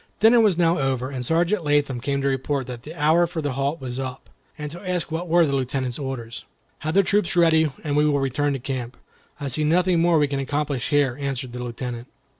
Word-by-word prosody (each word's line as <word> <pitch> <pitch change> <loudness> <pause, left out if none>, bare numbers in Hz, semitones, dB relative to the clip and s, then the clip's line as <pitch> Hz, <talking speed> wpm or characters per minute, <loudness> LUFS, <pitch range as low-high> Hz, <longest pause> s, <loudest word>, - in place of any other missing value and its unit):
Dinner 230 +3 +6
was 210 -6 +4
now 170 -1 +3
over, 135 -1 -1
and 130 -2 -4
Sergeant 170 - +1
Latham 145 -4 +1
came 140 +1 -1
to - - +1
report 135 0 -1
that 125 -1 -7
the 155 +6 -10
hour 160 +3 +3
for 170 -1 -5
the 145 -2 -1
halt 140 +4 -1
was 130 -1 -5
up, 130 -1 -6 0.3
and 150 -1 -5
to 175 - -9
ask 180 -4 -2
what 165 +3 -3
were 170 0 +4
the 140 -2 0
Lieutenant's 130 -1 -2
orders. 125 -4 -5 0.4
"Have 155 +2 -3
the 195 - +6
troop 200 -1 +1
ready, 160 -2 +4
and 145 -2 -1
we 150 +1 +4
will 145 -1 +2
return 140 +2 0
to 135 - -3
camp. 125 -1 -5 0.4
I 145 - -4
see 140 +4 0
nothing 175 +3 +3
more 170 0 +4
we 145 -1 +3
can 140 -1 -2
accomplish 140 -1 -2
here," 145 -4 +2
answered 135 -3 -3
the 125 0 -5
Lieutenant. 120 0 -5
145 Hz, 230 wpm, -23 LUFS, 130-165 Hz, 0.4 s, Dinner